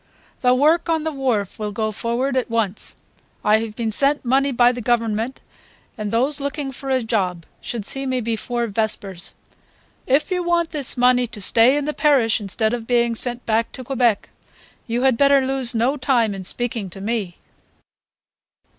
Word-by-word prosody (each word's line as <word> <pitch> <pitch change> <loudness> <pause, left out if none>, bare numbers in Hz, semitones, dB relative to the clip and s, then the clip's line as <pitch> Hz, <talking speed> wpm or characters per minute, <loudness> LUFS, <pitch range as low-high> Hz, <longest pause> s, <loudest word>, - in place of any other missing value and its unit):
"The 250 0 +3
work 315 +6 +3
on 320 -2 +1
the 320 - -2
wharf 245 -10 -2
will 210 -1 -3
go 215 +1 -2
forward 235 +5 -2
at 255 -2 0
once... 220 -3 -1 0.5
I 210 +1 +5
have 220 -1 -5
been 225 -2 -2
sent 280 +5 +1
money 270 +3 +2
by 245 -1 +4
the 245 0 -6
Government, 230 +1 -1 0.5
and 210 -1 -4
those 265 +7 +1
looking 280 0 -3
for 270 +1 -7
a 260 -2 +1
job 185 -7 -1 0.2
should 230 -4 -5
see 270 +3 -3
me 255 -1 0
before 235 +1 -2
vespers. 200 -4 -2 0.7
If 280 +8 +2
you 360 -1 0
want 345 -1 0
this 280 -4 +2
money 250 0 +3
to 225 -2 -10
stay 230 +7 +4
in 290 - -2
the 300 - -2
parish 255 -8 +2
instead 220 +3 -1
of 230 -2 -4
being 235 -1 +2
sent 245 +1 0
back 225 0 0
to 255 - -8
Quebec 245 -5 +1 0.6
you 240 +2 -1
had 260 -3 +3
better 280 0 +4
lose 260 -3 -1
no 250 +6 +1
time 245 -5 +1
in 195 -1 -6
speaking 225 -1 -1
to 185 - -9
me." 200 -4 -3
240 Hz, 180 wpm, -21 LUFS, 220-270 Hz, 0.7 s, I